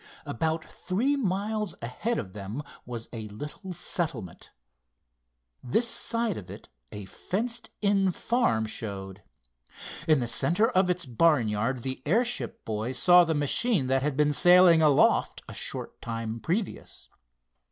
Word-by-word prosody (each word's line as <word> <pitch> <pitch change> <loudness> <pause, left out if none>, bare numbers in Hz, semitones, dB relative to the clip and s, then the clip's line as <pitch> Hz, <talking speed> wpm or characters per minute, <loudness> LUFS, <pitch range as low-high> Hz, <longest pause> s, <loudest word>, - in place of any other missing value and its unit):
About 160 +6 -2
three 235 +11 -1
miles 210 - -2
ahead 160 - -3
of 95 - -5
them 105 +7 -6 0.2
was 120 -2 -6
a 110 -2 -6
little 150 - -8
settlement. 155 - -5 1.1
This 220 - +1
side 230 -2 -1
of 95 - -9
it - - -11 0.2
a 105 -1 -7
fenced 230 - -3
in 195 -2 +3
farm 170 - +1
showed. 100 -3 -6 0.9
In 155 -3 +5
the 120 - -1
center 175 - +2
of 185 -6 +2
its 180 -2 0
barnyard 120 -3 +1
the 130 -1 -4
airship 230 +4 0
boys 110 +4 -3
saw 180 +3 +7
the 165 -2 0
machine 145 - +2
that 135 +1 +1
had 140 -1 -1
been 150 0 +3
sailing 175 0 +6
aloft 150 -3 +3
a - - -8
short - - -6
time 115 0 -4
previous. 190 - -4
155 Hz, 135 wpm, -27 LUFS, -, 1.1 s, saw